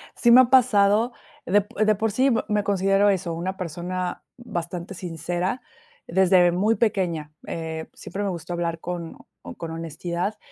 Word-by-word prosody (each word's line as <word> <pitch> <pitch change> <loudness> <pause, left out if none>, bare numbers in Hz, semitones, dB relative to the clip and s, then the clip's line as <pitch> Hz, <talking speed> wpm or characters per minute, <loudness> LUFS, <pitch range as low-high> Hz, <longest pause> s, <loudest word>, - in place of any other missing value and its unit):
Sí 240 - +4
me 250 +2 +10
ha 250 - +2
pasado, 230 -3 +4 0.3
de 205 +3 +4
po 205 +1 -14
de 215 0 +4
por 220 +2 -1
sí, 260 +6 +2
m 235 -4 +2
me 210 -1 +1
considero 195 +1 +3
eso, 185 -3 0
una 185 +3 -4
persona 180 +1 -4
bastante 175 -5 -5
sincera 175 - -3 0.5
desde 180 0 +4
muy 210 +6 +2
pequeña. 175 -9 -1
Eh, 160 -1 -5
siempre 200 +4 -6
me 200 - 0
gustó 175 -1 -5
hablar 170 -1 -2
con 170 -1 -6 0.4
con 165 -1 -6
honestidad, 170 +5 -4
185 Hz, 160 wpm, -24 LUFS, 170-205 Hz, 0.5 s, me